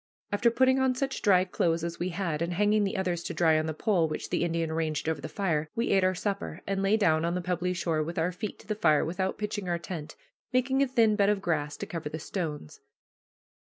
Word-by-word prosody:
After 205 Hz, +4 st, +3 dB
putting 260 Hz, +2 st, +3 dB
on 260 Hz, -1 st, +2 dB
such 270 Hz, +1 st, -2 dB
dry 185 Hz, -3 st, +4 dB
clothes 170 Hz, -2 st, 0 dB
as 170 Hz, 0 st, -4 dB
we 175 Hz, +2 st, -1 dB
had, 170 Hz, -3 st, -2 dB
and 170 Hz, +1 st, -1 dB
hanging 210 Hz, +2 st, +3 dB
the 195 Hz, -, -2 dB
others 180 Hz, -3 st, -1 dB
to -, -, -5 dB
dry 160 Hz, -2 st, +4 dB
on 155 Hz, -, -2 dB
the 160 Hz, -, -2 dB
pole 180 Hz, -4 st, +2 dB
which 155 Hz, -, -5 dB
the -, -, +1 dB
Indian 165 Hz, -1 st, -1 dB
arranged 160 Hz, -1 st, -1 dB
over 160 Hz, -3 st, -1 dB
the 155 Hz, -, -6 dB
fire, 160 Hz, -6 st, -1 dB
we 230 Hz, -, 0 dB
ate 195 Hz, -, +4 dB
our 185 Hz, 0 st, +2 dB
supper, 200 Hz, +2 st, -3 dB
and 195 Hz, -1 st, -1 dB
lay 195 Hz, +3 st, +3 dB
down 160 Hz, -6 st, +3 dB
on 170 Hz, +1 st, 0 dB
the -, -, 0 dB
pebbly 180 Hz, 0 st, -1 dB
shore 160 Hz, -2 st, 0 dB
with 165 Hz, +3 st, -4 dB
our 165 Hz, +2 st, +1 dB
feet 200 Hz, +4 st, -5 dB
to -, -, -17 dB
the 215 Hz, -, 0 dB
fire 155 Hz, -8 st, +3 dB
without 185 Hz, +3 st, -2 dB
pitching 205 Hz, -2 st, -3 dB
our 175 Hz, -, +1 dB
tent, 170 Hz, -3 st, -7 dB, 0.4 s
making 265 Hz, +1 st, +2 dB
a 275 Hz, -, +3 dB
thin 230 Hz, -4 st, +3 dB
bed 200 Hz, -1 st, +3 dB
of 210 Hz, -1 st, +2 dB
grass 150 Hz, -5 st, -1 dB
to -, -, -4 dB
cover 165 Hz, -3 st, -5 dB
the 155 Hz, -, -5 dB
stones. 155 Hz, -, -5 dB
180 Hz, 245 wpm, -28 LUFS, 160-205 Hz, 0.4 s, dry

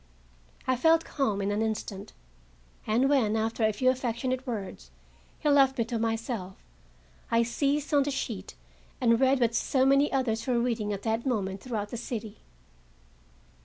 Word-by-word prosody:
I 255 Hz, -, +2 dB
felt 325 Hz, +4 st, +4 dB
calmed 215 Hz, -8 st, -1 dB
in 200 Hz, -, 0 dB
an 205 Hz, +1 st, 0 dB
instant, 215 Hz, -3 st, -4 dB, 0.7 s
and 235 Hz, +5 st, +3 dB
when, 250 Hz, -7 st, +2 dB
after 225 Hz, +1 st, -1 dB
a 220 Hz, -, +4 dB
few 255 Hz, +5 st, +2 dB
affectionate 255 Hz, +1 st, -2 dB
words, 195 Hz, -, -5 dB, 0.5 s
he -, -, -3 dB
left 275 Hz, -2 st, +4 dB
me 230 Hz, -, +1 dB
to 230 Hz, -1 st, -3 dB
myself, 225 Hz, -4 st, -3 dB, 0.7 s
I 230 Hz, 0 st, +3 dB
seized 280 Hz, +5 st, -1 dB
on 290 Hz, -, +5 dB
the 280 Hz, -, 0 dB
sheet 240 Hz, -7 st, -4 dB, 0.4 s
and 230 Hz, -3 st, +3 dB
read 265 Hz, 0 st, +3 dB
what 235 Hz, -2 st, +2 dB
so 260 Hz, +3 st, +1 dB
many 275 Hz, +2 st, +4 dB
others 250 Hz, -3 st, -1 dB
were 250 Hz, -2 st, +2 dB
reading 230 Hz, -3 st, -1 dB
at 200 Hz, -1 st, -4 dB
that 225 Hz, +3 st, -1 dB
moment 195 Hz, -6 st, -1 dB
throughout 215 Hz, -5 st, -4 dB
the 240 Hz, -, -5 dB
city. 225 Hz, -3 st, -6 dB
235 Hz, 165 wpm, -28 LUFS, 220-265 Hz, 0.7 s, on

